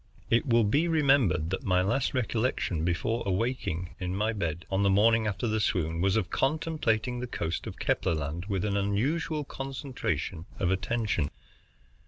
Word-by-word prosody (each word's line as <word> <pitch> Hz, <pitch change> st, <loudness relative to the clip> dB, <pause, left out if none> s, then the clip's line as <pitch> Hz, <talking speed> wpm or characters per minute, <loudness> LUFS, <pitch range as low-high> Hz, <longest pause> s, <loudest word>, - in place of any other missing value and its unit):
It 115 Hz, +4 st, +3 dB
will 115 Hz, -2 st, +4 dB
be 145 Hz, +11 st, +2 dB
remembered 135 Hz, -, +3 dB
that 95 Hz, -, -2 dB
my 90 Hz, -1 st, +2 dB
last 135 Hz, +8 st, 0 dB
recollection 115 Hz, -8 st, 0 dB
before 90 Hz, +7 st, 0 dB
awaking 95 Hz, -4 st, -2 dB
in 90 Hz, 0 st, -2 dB
my 105 Hz, +3 st, 0 dB
bed, 85 Hz, -4 st, -3 dB
on 95 Hz, +1 st, +1 dB
the 100 Hz, -, +4 dB
morning 110 Hz, +3 st, +4 dB
after 105 Hz, +4 st, -1 dB
the 110 Hz, 0 st, +1 dB
swoon, 85 Hz, -5 st, 0 dB
was 95 Hz, +1 st, +2 dB
of 95 Hz, -5 st, -1 dB
contemplating 135 Hz, -6 st, 0 dB
the 125 Hz, -, -4 dB
coast 105 Hz, -7 st, -3 dB
of -, -, -7 dB
Kepler 85 Hz, -, +1 dB
Land 80 Hz, +4 st, -4 dB
with 100 Hz, -2 st, -1 dB
an 100 Hz, -1 st, 0 dB
unusual 135 Hz, +11 st, 0 dB
concentration 130 Hz, -, -4 dB
of 90 Hz, -1 st, +1 dB
attention. 95 Hz, -6 st, 0 dB
105 Hz, 165 wpm, -29 LUFS, 90-125 Hz, -, will